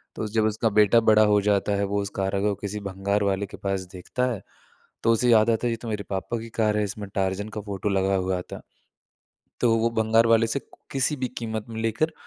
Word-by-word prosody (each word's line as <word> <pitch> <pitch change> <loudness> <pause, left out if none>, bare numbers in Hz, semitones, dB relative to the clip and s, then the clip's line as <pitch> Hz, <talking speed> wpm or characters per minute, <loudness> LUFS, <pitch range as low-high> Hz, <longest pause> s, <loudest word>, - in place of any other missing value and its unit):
तो 110 - -3
जब 110 +1 +1
उसका 110 +1 +1
बेटा 105 +2 +5
बड़ा 110 0 +6
हो 105 0 +4
जाता 105 0 +1
है, 100 - 0
वो 100 +1 -1
उस 100 - -4
कार 95 0 -1
को 105 0 +1
किसी 105 +1 -4
भंगार 100 +2 -1
वाले 100 0 0
के - - -11
पास 95 -1 -2
देखता 125 +7 -2
है, 100 - -7 0.6
तो 115 - +4
उसे 120 +2 +2
याद 110 0 +5
आता 115 +2 0
है, - - 0
"ये 115 - -2
तो 120 - -7
मेरे 105 -1 -3
पापा 95 +4 -2
की 115 +1 -8
कार 105 -1 +2
है। 105 - +2
इसमें 100 0 -5
टार्ज़न 95 +2 -1
का - - -2
फ़ोटो 100 0 -3
लगा 95 0 +1
हुआ 95 -1 -1
था।" - - -7 1.0
तो 115 -2 +4
वो 115 +1 +1
भंगार 115 +1 +4
वाले 115 0 +4
से 135 +4 -2 0.3
किसी 140 +2 0
भी 130 -1 -2
क़ीमत 110 -2 -4
में 110 0 -5
लेकर 115 +9 0
105 Hz, 235 wpm, -25 LUFS, 100-115 Hz, 1.0 s, बड़ा